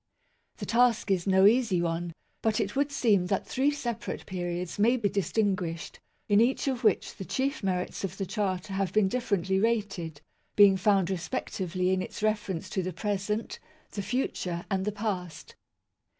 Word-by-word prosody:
The - - -5
task 230 -3 +3
is 185 -1 +1
no 190 0 +5
easy 220 -4 +4
one; 170 0 -2 0.3
but 220 -1 +1
it 205 0 -2
would 285 +1 +1
seem 210 -9 +2
that 195 - 0
three 270 +3 +1
separate 240 -6 -4
periods 175 -1 -4
may 235 +5 +4
be 210 -4 +1
distinguished, 195 -4 -1 0.3
in 205 0 +5
each 255 +4 +1
of 260 -2 -1
which 215 -5 +2
the - - -5
chief 270 +8 -1
merits 185 -2 -2
of 190 -1 -4
the 195 - -2
Charter 195 -1 -2
have 195 -1 -1
been 215 -2 +3
differently 190 -4 0
rated, 195 -8 -1 0.4
being 200 -2 +7
found 195 -1 +2
respectively 185 -1 -2
in 190 0 +1
its 210 - -6
reference 210 -5 -1
to 190 - 0
the 185 0 -4
present, 205 +4 -2 0.3
the 200 - -4
future, 185 -7 -2
and 190 -1 0
the 210 - 0
past. 195 -6 -4
195 Hz, 165 wpm, -28 LUFS, 185-220 Hz, 0.4 s, being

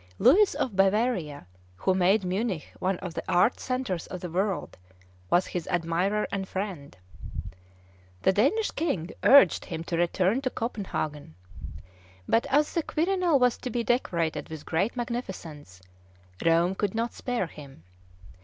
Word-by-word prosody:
Louis 335 - +5
of 265 -8 -2
Bavaria, 195 - +1 0.3
who 185 - +1
made 190 +3 +3
Munich 190 -2 -2
one 185 0 0
of 180 -2 -5
the - - -3
art 180 +7 +3
centres 255 -10 -3
of 185 - -6
the 175 -1 -6
world, 190 +2 -1 0.5
was 175 - +3
his 175 -2 -5
admirer 175 +5 0
and 195 -1 -3
friend. 185 - -5 1.3
The - - +5
Danish 330 - +2
King 195 - -2
urged 275 - +6
him 165 -1 -5
to 170 0 -3
return 185 +7 +1
to 260 - -1
Copenhagen; 155 - -4 0.9
but, 225 - +2
as 295 +2 +2
the 335 - +1
Quirinal 345 0 +1
was 250 -2 +3
to 255 - -4
be 240 0 -1
decorated 170 -10 -1
with 160 -2 -8
great 190 +10 0
magnificence, 175 - -6 0.6
Rome 170 +2 +3
could 200 +1 -2
not 230 +1 -1
spare 245 -6 -2
him. 140 - -13
190 Hz, 145 wpm, -27 LUFS, 170-245 Hz, 1.3 s, urged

